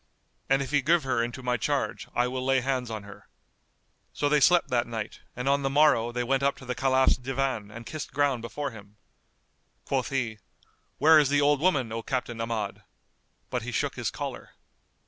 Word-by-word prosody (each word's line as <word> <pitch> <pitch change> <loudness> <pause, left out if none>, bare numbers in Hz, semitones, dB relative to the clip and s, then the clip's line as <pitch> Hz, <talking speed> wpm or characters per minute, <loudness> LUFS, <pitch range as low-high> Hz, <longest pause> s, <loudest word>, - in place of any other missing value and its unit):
And 135 +1 +3
if 135 - -7
he 145 -1 +3
give 165 +4 +3
her 130 -3 0
into 120 +2 -5
my 125 0 +1
charge, 140 +4 -2
I 120 +1 +2
will 130 +1 -3
lay 135 0 +2
hands 130 -2 -1
on 110 -2 -5
her." 100 0 -13 0.9
So 145 - 0
they 150 0 +4
slept 175 +4 +4
that 120 -1 +1
night 110 -2 -5 0.2
and 125 +2 -4
on 140 +1 +3
the 135 - 0
morrow 135 -5 +4
they 125 +1 -2
went 135 +2 +1
up 140 0 +1
to 130 - -12
the 125 - -2
Caliph's 130 +1 +3
Divan 130 -4 -2
and 115 +2 -10
kissed 155 +3 -6
ground 140 -4 +1
before 135 +5 -4
him. 105 -2 -13 0.9
Quoth 130 -3 -1
he, 115 -6 -2 0.6
"Where 155 +2 +7
is 145 -3 +3
the 145 0 +3
old 145 0 +3
woman, 140 -10 +2
O 115 +1 -3
Captain 120 -1 -3
Ahmad?" 115 -3 -3 0.7
But - - -1
he - - -5
shook - - -1
his - - -2
collar. - - -7
130 Hz, 200 wpm, -27 LUFS, 115-140 Hz, 0.9 s, Where